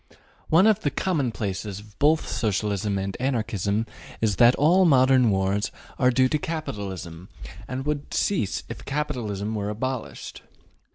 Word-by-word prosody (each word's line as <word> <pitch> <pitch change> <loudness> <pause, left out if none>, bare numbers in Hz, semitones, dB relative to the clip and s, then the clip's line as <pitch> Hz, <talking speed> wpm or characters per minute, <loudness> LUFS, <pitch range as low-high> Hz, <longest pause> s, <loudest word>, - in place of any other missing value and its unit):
One 170 +5 +5
of 215 -2 +4
the 145 - 0
commonplaces 110 - -2
of 105 0 -17
both 155 +2 +3
Socialism 105 -1 -1
and 95 0 -3
Anarchism 110 -5 -1 0.3
is 105 -4 +1
that 120 +1 +6
all 175 +6 +4
modern 130 -6 +5
wars 95 +1 +1 0.3
are 125 - +5
due 130 +1 +3
to 150 - 0
capitalism, 95 - -5 0.4
and 130 +1 -4
would 150 -1 -3
cease 170 - 0
if - - -8
capitalism 120 -8 -3
were 105 -1 -2
abolished. 125 +3 -5
115 Hz, 135 wpm, -25 LUFS, 100-140 Hz, 0.4 s, that